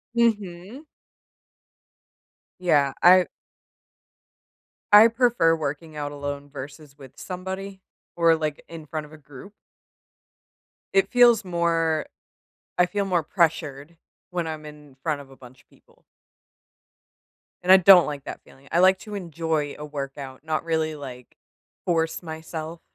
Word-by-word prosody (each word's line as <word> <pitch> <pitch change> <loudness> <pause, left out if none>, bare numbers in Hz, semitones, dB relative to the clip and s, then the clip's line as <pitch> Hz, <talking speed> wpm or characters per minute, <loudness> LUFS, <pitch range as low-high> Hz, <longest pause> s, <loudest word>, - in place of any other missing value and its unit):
Mhm. 215 - -1 1.7
Yeah. 150 -6 +2
I 180 +1 +7 1.7
I 210 +2 +10
prefer 230 -8 +2
working 155 +1 -5
out 145 -1 -4
alone 145 0 -6
versus 140 +2 -10
with 135 -2 -13
somebody 190 +1 -7 0.3
or, 165 -1 +4
like, 155 -2 -4
in 165 -2 -9
front 155 0 -5
of - - -20
a 155 - -12
group. 145 +6 -13 1.4
It 195 0 +3
feels 240 -3 +5
more 165 -3 0 0.7
I 180 - +4
feel 200 +3 -2
more 180 -3 0
pressured 160 -2 -1 0.3
when 175 -2 -3
I'm 155 -1 -6
in 150 -2 -14
front 150 -3 -1
of 135 -1 -13
a 135 - -15
bunch 130 0 -16
of - - -50
people. - - -27 1.6
And 180 - +3
I 190 - +10
don't 185 -1 +8
like 145 -2 -6
that - - -7
feeling. 135 +1 -20
I 170 - +2
like 185 +1 +5
to 210 -1 -8
enjoy 160 -5 -3
a 150 - -6
workout, 140 -2 -7
not 155 0 -2
really, 160 -1 -1
like, 130 -4 -10 0.5
force 165 -2 0
myself. 160 0 -7
160 Hz, 135 wpm, -24 LUFS, 145-180 Hz, 1.7 s, I